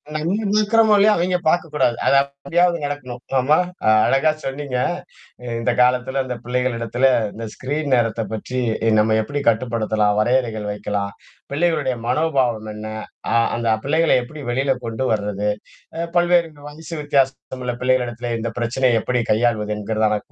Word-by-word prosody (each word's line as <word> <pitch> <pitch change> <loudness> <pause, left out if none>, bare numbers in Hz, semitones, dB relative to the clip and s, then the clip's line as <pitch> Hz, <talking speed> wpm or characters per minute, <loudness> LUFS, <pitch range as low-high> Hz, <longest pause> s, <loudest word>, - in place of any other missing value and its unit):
நம்ம 165 +6 0 0.2
இருக்கிரமோ 215 0 +4
இல்லயோ 210 +2 +5
அவங்க 180 +1 +1
பார்க்கக்கூடாது. 150 -7 +1
அது 140 - +4
அப்படியாவது 170 +5 0
நடக்கணும். 130 -4 -5 0.2
ஆமா 145 +5 +3 0.5
அழகா 135 +4 +3
சொன்னீங்க. 135 -1 -3 0.7
அ - - -9
இந்த 115 - +1
காலத்தில 125 +2 +2
அந்த 125 -1 -4
பிள்ளைகளிடத்தில 125 0 0 0.3
இந்த 115 +1 -6
ஸ்கிரீன் 145 +2 -3
நேரத்தைப் 115 -2 -1
பற்றி 125 +4 -4 0.4
நம்ம 110 +1 +3
எப்படி 145 +6 -3
கட்டுப்படுத்தலாம், 110 -3 0
வரையறைகள் 115 -3 0
வைக்கலாம். 100 -1 -3 0.4
பிள்ளைகளுடைய 150 -4 +1
மனோபாவம் 130 -8 +1
என்ன? 105 +1 -7 0.4
அ - - +1 0.2
அந்த 115 -1 -1
பிள்ளைகள 160 +4 +2
எப்படி 150 +4 -10
வெளில 135 +3 +1
கொண்டு 115 +3 -3
வர்றது. 105 -1 -1 0.5
அ - - -3 0.2
பல்வேறு 175 -1 +3 0.2
வயசு 160 +2 -10
வித்தியாசம் 135 -2 0
உள்ள 125 - -1
பிள்ளைகளிடத்தில 125 -2 0
இந்த 115 +1 -2
பிரச்சனைய 120 0 +1
எப்படி 125 -1 0
கையாள்வது 110 -2 +1
என்கறதான 105 0 0
125 Hz, 135 wpm, -21 LUFS, 115-145 Hz, 0.7 s, இல்லயோ